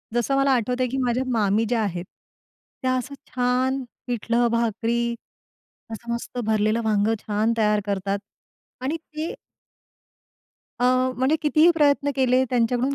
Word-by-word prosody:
जसं 240 Hz, +3 st, +1 dB
मला 275 Hz, 0 st, +3 dB
आठवतंय, 250 Hz, +1 st, +1 dB
की 265 Hz, -, -3 dB
माझ्या 245 Hz, +1 st, +1 dB
मामी 215 Hz, -1 st, +2 dB
ज्या 235 Hz, -2 st, +1 dB
आहेत, 180 Hz, -3 st, -3 dB, 0.8 s
त्या 255 Hz, 0 st, +1 dB
असं 270 Hz, +3 st, -5 dB
छान 255 Hz, +2 st, 0 dB, 0.2 s
पिठलं 240 Hz, 0 st, +1 dB
भाकरी 235 Hz, +1 st, 0 dB, 0.8 s
असं 235 Hz, +2 st, -5 dB
मस्त 235 Hz, +1 st, -6 dB
भरलेलं 215 Hz, +1 st, +1 dB
वांग 210 Hz, -1 st, +2 dB
छान 215 Hz, +2 st, 0 dB
तयार 210 Hz, -1 st, +3 dB
करतात. 200 Hz, 0 st, -1 dB, 0.6 s
आणि 270 Hz, +5 st, -1 dB
ते 315 Hz, 0 st, -6 dB, 1.5 s
अ, -, -, +2 dB, 0.3 s
म्हणजे 265 Hz, +5 st, +2 dB
कितीही 310 Hz, +2 st, +5 dB
प्रयत्न 285 Hz, -2 st, +3 dB
केले, 260 Hz, -1 st, +3 dB
त्यांच्याकडून 245 Hz, +2 st, +1 dB
240 Hz, 130 wpm, -24 LUFS, 220-260 Hz, 1.5 s, कितीही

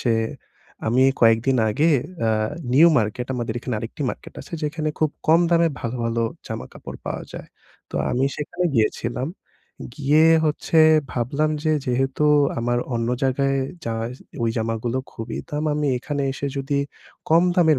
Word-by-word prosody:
সে 120 Hz, -2 st, +2 dB, 0.7 s
আমি 120 Hz, +4 st, +3 dB, 0.2 s
কয়েকদিন 115 Hz, +3 st, +4 dB
আগে 150 Hz, +10 st, +2 dB, 0.4 s
আ -, -, +2 dB, 0.4 s
নিউ 155 Hz, +6 st, +7 dB
মার্কেট, 110 Hz, +3 st, -2 dB
আমাদের 120 Hz, -2 st, -3 dB
এখানে 120 Hz, 0 st, -4 dB
আরেকটি 115 Hz, +7 st, -6 dB
মার্কেট -, -, -10 dB
আছে। -, -, -14 dB
যেখানে 155 Hz, +1 st, -1 dB
খুব 155 Hz, -1 st, +2 dB, 0.2 s
কম 165 Hz, +2 st, +6 dB
দামে 170 Hz, -1 st, +4 dB
ভালো, 120 Hz, +2 st, -3 dB
ভালো 115 Hz, 0 st, 0 dB, 0.2 s
জামাকাপড় -, -, -8 dB
পাওয়া -, -, -3 dB
যায়। -, -, -8 dB, 0.4 s
তো -, -, -12 dB, 0.2 s
আমি 130 Hz, +2 st, +1 dB
সেখানে 155 Hz, +4 st, -3 dB
গিয়েছিলাম। 120 Hz, +3 st, 0 dB, 0.7 s
গিয়ে 150 Hz, +4 st, +4 dB, 0.2 s
হচ্ছে 155 Hz, +1 st, +1 dB, 0.3 s
ভাবলাম 140 Hz, +6 st, 0 dB
যে, 155 Hz, -, +3 dB
যেহেতু 135 Hz, +3 st, 0 dB, 0.3 s
আমার 120 Hz, +1 st, 0 dB, 0.2 s
অন্য 115 Hz, 0 st, -1 dB
জায়গায় 135 Hz, +1 st, +1 dB, 0.3 s
জা 115 Hz, -, -2 dB, 0.5 s
ওই 115 Hz, -, +2 dB
জামাগুলো 115 Hz, +2 st, -1 dB
খুবই 115 Hz, -, -6 dB
দাম। 150 Hz, +1 st, -2 dB
আমি 150 Hz, 0 st, 0 dB
এখানে 140 Hz, +3 st, -3 dB
এসে 140 Hz, +1 st, -4 dB
যদি 140 Hz, +1 st, -1 dB, 0.5 s
কম 165 Hz, +2 st, +6 dB
দামের 160 Hz, -5 st, +4 dB
135 Hz, 150 wpm, -23 LUFS, 115-150 Hz, 0.7 s, নিউ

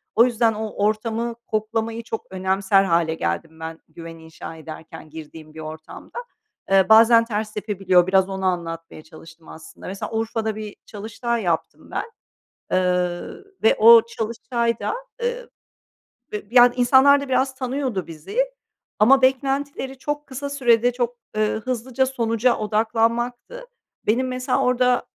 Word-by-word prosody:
O 230 Hz, -, +7 dB
yüzden 230 Hz, -2 st, +2 dB
o 215 Hz, 0 st, -4 dB, 0.2 s
ortamı 230 Hz, +2 st, -1 dB
koklamayı 225 Hz, +1 st, -2 dB
çok 225 Hz, -1 st, -5 dB
önemser 190 Hz, +1 st, +2 dB
hâle 170 Hz, -3 st, +1 dB
geldim 85 Hz, -, -3 dB
ben, 160 Hz, 0 st, -7 dB
güven 165 Hz, 0 st, -10 dB
inşa 160 Hz, 0 st, -10 dB
ederken, 160 Hz, 0 st, -10 dB
girdiğim 155 Hz, 0 st, -11 dB
bir 160 Hz, -, -10 dB
ortamda. 155 Hz, -, -9 dB, 0.5 s
Eee, 195 Hz, 0 st, +4 dB
bazen 230 Hz, +1 st, +7 dB
ters 215 Hz, -1 st, -3 dB
tepebiliyor, 195 Hz, -4 st, +2 dB
biraz 190 Hz, 0 st, +3 dB
onu 190 Hz, 0 st, -4 dB
anlatmaya 165 Hz, -3 st, -3 dB
çalıştım, 160 Hz, +1 st, -15 dB
aslında. 160 Hz, -, -12 dB
Mesela, 195 Hz, +4 st, -5 dB
Urfa'da 225 Hz, -1 st, -2 dB
bir 215 Hz, -1 st, -7 dB
çalıştay 225 Hz, +2 st, -4 dB
yaptım 170 Hz, -2 st, -3 dB
ben, 460 Hz, -, -4 dB, 0.6 s
eee, 180 Hz, -1 st, +1 dB, 0.4 s
ve 220 Hz, -, +5 dB
o 230 Hz, +1 st, +9 dB
çalıştayda, 235 Hz, -, -2 dB, 0.3 s
ııı, 485 Hz, 0 st, -3 dB, 0.8 s
bı 210 Hz, -, -3 dB
yani, 245 Hz, 0 st, +6 dB
insanlar 265 Hz, +3 st, +5 dB
da 280 Hz, -, -6 dB
biraz 265 Hz, +1 st, +1 dB
tanıyordu 255 Hz, -6 st, -3 dB
bizi 165 Hz, -, -8 dB, 0.6 s
ama 265 Hz, +5 st, +5 dB
beklentileri 270 Hz, 0 st, 0 dB
çok 295 Hz, +1 st, -4 dB
kısa 280 Hz, +1 st, -6 dB
sürede 245 Hz, -3 st, +3 dB
çok, 245 Hz, 0 st, -2 dB, 0.2 s
ııı, 215 Hz, +1 st, 0 dB
hızlıca 255 Hz, +2 st, -1 dB
sonuca 235 Hz, -1 st, +1 dB
odaklanmaktı. 230 Hz, -, -1 dB, 0.4 s
Benim, 250 Hz, +5 st, +1 dB
mesela, 255 Hz, 0 st, -1 dB
orada, 250 Hz, 0 st, +2 dB
220 Hz, 135 wpm, -22 LUFS, 185-245 Hz, 0.8 s, o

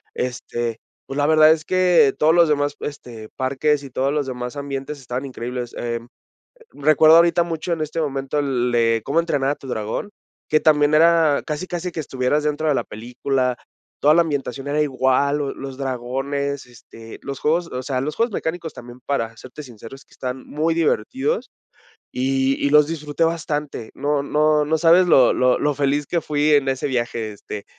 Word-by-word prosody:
este, 120 Hz, -2 st, -3 dB, 0.3 s
pues, 135 Hz, -, -6 dB
la 145 Hz, -, +2 dB
verdad 155 Hz, 0 st, +6 dB
es 155 Hz, -1 st, 0 dB
que 175 Hz, -6 st, +4 dB
todos 155 Hz, +1 st, +4 dB
los 170 Hz, -1 st, +5 dB
demás, 145 Hz, -1 st, 0 dB
este, 120 Hz, -6 st, -7 dB
parques 140 Hz, +3 st, 0 dB
y 140 Hz, -, -9 dB
todos 135 Hz, +3 st, 0 dB
los 150 Hz, -2 st, 0 dB
demás 125 Hz, 0 st, -5 dB
ambientes 140 Hz, +1 st, -5 dB
estaban 130 Hz, +1 st, -4 dB
increíbles. 125 Hz, -2 st, -6 dB
Em, 120 Hz, 0 st, -4 dB, 0.7 s
recuerdo 155 Hz, +2 st, +5 dB
ahorita 170 Hz, 0 st, +4 dB
mucho 170 Hz, +1 st, -4 dB
en 165 Hz, -, -2 dB
este 155 Hz, +2 st, -3 dB
momento 140 Hz, -1 st, -2 dB
el 130 Hz, -4 st, 0 dB
de 115 Hz, -1 st, +2 dB
Cómo 145 Hz, +4 st, 0 dB
entrenar 145 Hz, -5 st, 0 dB
a -, -, 0 dB
tu -, -, -13 dB
dragón, 110 Hz, -, -3 dB, 0.4 s
que 155 Hz, -, +3 dB
también 150 Hz, -1 st, +3 dB
era 160 Hz, -2 st, +4 dB
casi 155 Hz, +3 st, -4 dB
casi 180 Hz, 0 st, -4 dB
que 165 Hz, -, -7 dB
estuvieras 135 Hz, +1 st, -1 dB
dentro 150 Hz, +1 st, -1 dB
de 150 Hz, -, +3 dB
la -, -, -1 dB
película. 125 Hz, +3 st, -2 dB, 0.4 s
Toda 150 Hz, +2 st, +5 dB
la 170 Hz, -, +5 dB
ambientación 140 Hz, -4 st, -4 dB
era 150 Hz, +1 st, 0 dB
igual, 140 Hz, +1 st, +1 dB
lo 140 Hz, -2 st, -2 dB
los 135 Hz, -1 st, -8 dB
dragones, 135 Hz, +2 st, -3 dB
este, 115 Hz, -1 st, -13 dB
los 140 Hz, -1 st, -6 dB
juegos, 165 Hz, +3 st, +1 dB
o 125 Hz, -, -4 dB
sea, 130 Hz, -1 st, -2 dB
los 150 Hz, +3 st, -3 dB
juegos 230 Hz, 0 st, 0 dB
mecánicos 165 Hz, -2 st, -4 dB
también, 120 Hz, +1 st, -11 dB
para 115 Hz, -5 st, -2 dB
serte 130 Hz, +5 st, -10 dB
sincero, 115 Hz, 0 st, -11 dB
es 135 Hz, -, -18 dB
que -, -, -30 dB
están 130 Hz, 0 st, -6 dB
muy 160 Hz, +3 st, -1 dB
divertidos 215 Hz, -, -1 dB, 0.6 s
y 135 Hz, +1 st, +1 dB
y -, -, +2 dB
los 150 Hz, +1 st, +6 dB
disfruté 150 Hz, -1 st, -2 dB
bastante. 150 Hz, -7 st, -3 dB
No 145 Hz, +1 st, 0 dB
no 150 Hz, +1 st, +2 dB
no 160 Hz, +2 st, +1 dB
sabes 170 Hz, +3 st, +5 dB
lo 130 Hz, -7 st, +5 dB
lo 125 Hz, 0 st, +2 dB
lo 150 Hz, 0 st, +1 dB
feliz 145 Hz, +1 st, 0 dB
que 170 Hz, -, -1 dB
fui 150 Hz, 0 st, +1 dB
en 140 Hz, -2 st, +3 dB
ese 130 Hz, +1 st, -1 dB
viaje, 120 Hz, -4 st, -2 dB
este, 100 Hz, 0 st, -8 dB
140 Hz, 190 wpm, -21 LUFS, 130-155 Hz, 0.7 s, verdad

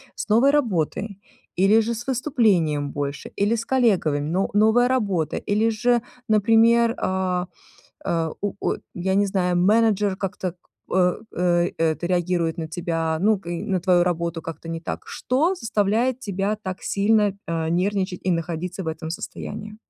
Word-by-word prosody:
С -, -, -6 dB
новой 235 Hz, +6 st, +5 dB
работой, 200 Hz, -, -1 dB, 0.4 s
или 205 Hz, +4 st, +5 dB
же 230 Hz, +1 st, -2 dB
с 235 Hz, +2 st, -7 dB
выступлением 205 Hz, -, +1 dB
больше, 140 Hz, 0 st, -4 dB
или 205 Hz, +3 st, +3 dB
с 225 Hz, -1 st, -2 dB
коллегами, 210 Hz, -, +2 dB
но 175 Hz, +8 st, -1 dB
новая 220 Hz, +4 st, +4 dB
работа? 200 Hz, -, 0 dB
Или 215 Hz, +3 st, +2 dB
же, 240 Hz, +2 st, +2 dB, 0.3 s
например, 230 Hz, +2 st, +4 dB
а, 185 Hz, -1 st, -1 dB, 0.6 s
а, 165 Hz, -1 st, 0 dB
у 205 Hz, -1 st, -1 dB
у -, -, 0 dB, 0.2 s
я 190 Hz, +2 st, -1 dB
не 200 Hz, +1 st, +3 dB
знаю, 180 Hz, -2 st, 0 dB
менеджер 205 Hz, +1 st, +3 dB
как-то, 185 Hz, -2 st, -4 dB, 0.3 s
э, 180 Hz, -1 st, +2 dB, 0.2 s
э, 175 Hz, 0 st, +1 dB
это 165 Hz, +1 st, 0 dB
реагирует 175 Hz, -2 st, 0 dB
на 160 Hz, -, -3 dB
тебя, 165 Hz, -1 st, -2 dB
ну, 210 Hz, +2 st, +3 dB
к 185 Hz, -, -12 dB
и 170 Hz, +1 st, -3 dB
на 190 Hz, -4 st, 0 dB
твою 175 Hz, -1 st, +3 dB
работу 170 Hz, -1 st, -2 dB
как-то 165 Hz, 0 st, -8 dB
не 165 Hz, 0 st, -4 dB
так? -, -, -5 dB
Что 305 Hz, +9 st, 0 dB
заставляет 230 Hz, -, 0 dB
тебя 200 Hz, -2 st, -2 dB
так 185 Hz, -2 st, -5 dB
сильно, 205 Hz, 0 st, +2 dB, 0.2 s
э, 165 Hz, -1 st, -1 dB
нервничать 185 Hz, +1 st, 0 dB
и -, -, +3 dB
находиться 175 Hz, +2 st, -3 dB
в -, -, -9 dB
этом 160 Hz, 0 st, -5 dB
состоянии? 210 Hz, +5 st, -6 dB
190 Hz, 160 wpm, -23 LUFS, 170-220 Hz, 0.6 s, новой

